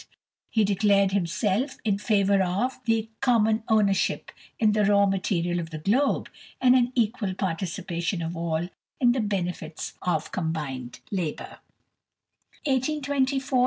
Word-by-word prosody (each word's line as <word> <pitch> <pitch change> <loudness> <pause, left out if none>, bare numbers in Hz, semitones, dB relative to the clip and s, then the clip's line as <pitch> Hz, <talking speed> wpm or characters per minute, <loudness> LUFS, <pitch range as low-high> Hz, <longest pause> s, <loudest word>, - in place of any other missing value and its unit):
He 220 - +2
declared 200 -1 +3
himself 200 - 0
in 200 -2 +1
favour 200 -2 +3
of 200 +9 -1
"the 225 -1 0
common 225 -4 +3
ownership 205 -3 +1 0.3
in 215 -2 +3
the 210 0 +2
raw 200 0 +4
material 180 -3 0
of 165 -1 -5
the 160 - -6
globe, 240 - +1 0.3
and 255 -1 +5
an 245 -1 +3
equal 220 -5 0
participation 175 -1 -2
of 165 +2 -4
all 165 +1 -2 0.3
in 245 -2 +5
the 255 - 0
benefits 180 -6 -3
of 180 - -1
combined 150 -8 -4
labour." 175 -6 -4
195 Hz, 125 wpm, -26 LUFS, 175-220 Hz, 0.3 s, and